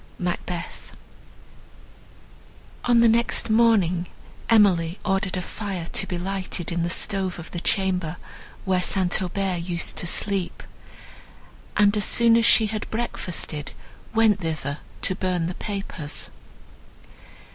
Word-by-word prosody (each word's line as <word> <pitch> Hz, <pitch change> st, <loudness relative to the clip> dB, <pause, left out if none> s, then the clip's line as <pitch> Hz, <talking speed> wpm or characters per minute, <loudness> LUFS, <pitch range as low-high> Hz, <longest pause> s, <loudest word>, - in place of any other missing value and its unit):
MACBETH 180 Hz, -1 st, -5 dB, 1.9 s
On 240 Hz, -1 st, +5 dB
the 235 Hz, -, +6 dB
next 230 Hz, 0 st, +2 dB
morning, 200 Hz, -7 st, +3 dB, 0.4 s
Emily 190 Hz, -6 st, +4 dB
ordered 195 Hz, -1 st, 0 dB
a 180 Hz, -, -3 dB
fire 190 Hz, -5 st, -5 dB
to 195 Hz, -, 0 dB
be 180 Hz, -, -3 dB
lighted 185 Hz, -1 st, -3 dB
in 170 Hz, 0 st, -1 dB
the 170 Hz, -, 0 dB
stove 190 Hz, +1 st, 0 dB
of 170 Hz, -, -9 dB
the 175 Hz, -, -4 dB
chamber, 180 Hz, -3 st, 0 dB, 0.5 s
where 185 Hz, -1 st, +2 dB
St. 185 Hz, +1 st, +2 dB
Aubert 185 Hz, -1 st, -1 dB
used 170 Hz, -1 st, -1 dB
to 175 Hz, -, -1 dB
sleep; 195 Hz, 0 st, -1 dB, 1.1 s
and, 205 Hz, 0 st, +5 dB
as 210 Hz, -, +2 dB
soon 235 Hz, -1 st, +4 dB
as 230 Hz, -1 st, +4 dB
she 225 Hz, -, +6 dB
had 215 Hz, 0 st, -4 dB
breakfasted, 180 Hz, -9 st, -4 dB, 0.4 s
went 220 Hz, -3 st, +3 dB
thither 155 Hz, -4 st, -3 dB, 0.2 s
to -, -, +2 dB
burn 180 Hz, -2 st, -1 dB
the 175 Hz, -, -3 dB
papers. 190 Hz, -7 st, -4 dB
185 Hz, 125 wpm, -24 LUFS, 175-210 Hz, 1.9 s, the